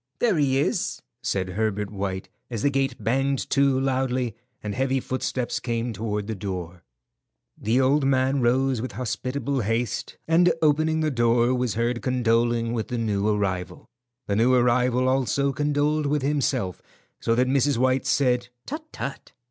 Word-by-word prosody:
"There 230 -5 +2
he 135 -3 +2
is," 140 - 0 0.2
said 95 -2 -1
Herbert 105 +1 -1
White, 95 -2 -3 0.2
as 115 -4 -4
the 145 - +3
gate 135 0 0
banged 135 +4 0
to 135 -1 +3
loudly 130 -3 0 0.3
and 105 -1 -3
heavy 135 +2 +1
footsteps 130 -1 -2
came 115 -1 -2
toward 105 -1 -3
the 110 - -3
door. 90 -3 -5 0.7
The 115 +4 +1
old 140 +3 +3
man 135 0 +2
rose 130 0 +2
with 130 - -5
hospitable 130 +2 -2
haste, 115 +2 -2
and 175 +2 +5
opening 155 +1 +2
the 155 -1 +1
door, 120 0 +3
was 125 -4 -1
heard 120 +1 0
condoling 120 -2 +1
with 115 -2 -2
the 125 - -3
new 105 -3 0
arrival. 100 -4 -1 0.4
The 100 - -1
new 120 +4 +4
arrival 125 +1 +3
also 135 +1 +1
condoled 150 +1 +1
with 145 -1 0
himself, 135 -9 0 0.4
so 115 - +1
that 125 +2 +3
Mrs. 135 0 +2
White 130 +1 +1
said, 125 -3 +2 0.2
"Tut, 310 +3 -5
tut!" 140 - -6
125 Hz, 155 wpm, -25 LUFS, 115-135 Hz, 0.7 s, and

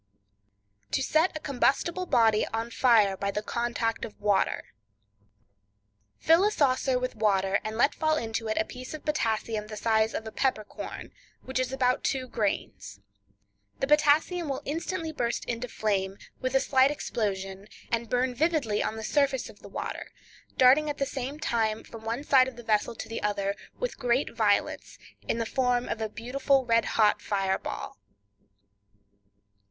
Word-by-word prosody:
To - - +2
Set 315 +1 +2
a - - -7
Combustible 300 +6 0
Body 225 -6 +3
on 225 +1 -3
Fire 225 -6 +4
by 200 +1 -2
the 210 +1 -2
Contact 235 0 -1
of 215 - -7
Water.—Fill 100 - -2
a 415 - +4
saucer 265 -7 +2
with 255 0 -2
water, 200 -3 +2
and 220 +1 -4
let 280 +5 +4
fall 310 -1 +1
into 225 -3 -3
it 215 - -1
a 220 - +2
piece 255 +6 -8
of 305 - -11
potassium 225 -7 -1
the 215 0 -7
size 220 0 +2
of 225 - -4
a 220 - -6
pepper 255 -4 0
corn, - - -8 0.3
which 260 0 -2
is 255 0 -1
about 255 -1 +1
two 260 -2 -1
grains. 215 -5 -3 0.8
The - - +1
potassium 300 +3 +3
will 270 - -3
instantly 325 +2 -3
burst 240 -6 -2
into 235 +1 -3
flame, 195 -4 -1 0.2
with 255 +1 -2
a - - +6
slight 265 0 +4
explosion, 195 -8 -3 0.2
and 230 0 -1
burn 250 +1 +1
vividly 285 -7 +1
on - - -2
the 220 - -6
surface 275 +1 +1
of - - -22
the - - -12
water, - - -5 0.5
darting 275 +4 +6
at 290 - -3
the 275 - 0
same 275 +2 -5
time, 225 -6 0
from 225 -1 -11
one 230 +5 -2
side 260 -3 +5
of 260 - -7
the 240 - -10
vessel 220 +1 +1
to - - -7
the 225 - -5
other, 200 -1 -1 0.2
with - - -4
great 250 +1 +1
violence, 210 -3 0 0.3
in - - 0
the 230 - -1
form 250 0 +1
of 225 - -3
a 220 - -1
beautiful 260 +4 0
red 230 -1 +3
hot 215 -2 +4
fire 195 -2 0
ball. - - -6
235 Hz, 170 wpm, -28 LUFS, 210-270 Hz, 0.8 s, a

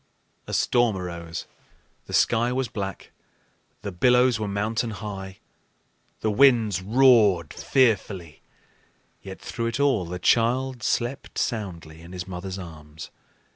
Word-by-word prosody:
A - - -6
storm 120 -5 +2
arose, 85 -2 -6 0.6
the - - -9
sky 115 +2 +3
was 130 0 -1
black, 95 -3 -6 0.7
the 100 - -4
billows 125 +5 +3
were 105 - -2
mountain 110 +4 -1
high, 95 -2 -7 0.8
the 110 - +1
winds 115 -6 +4
roared 105 - +4
fearfully; 100 - 0 0.8
yet 95 -1 -9
through 115 -2 -4
it 115 +3 -3
all 135 -10 +2
the 90 +1 -5
child 120 +6 +1
slept 120 +5 -2
soundly 85 -8 -4
in 85 +2 -12
his 90 0 -6
mother's 95 +1 -6
arms. 80 -4 -10
105 Hz, 125 wpm, -25 LUFS, 90-120 Hz, 0.8 s, winds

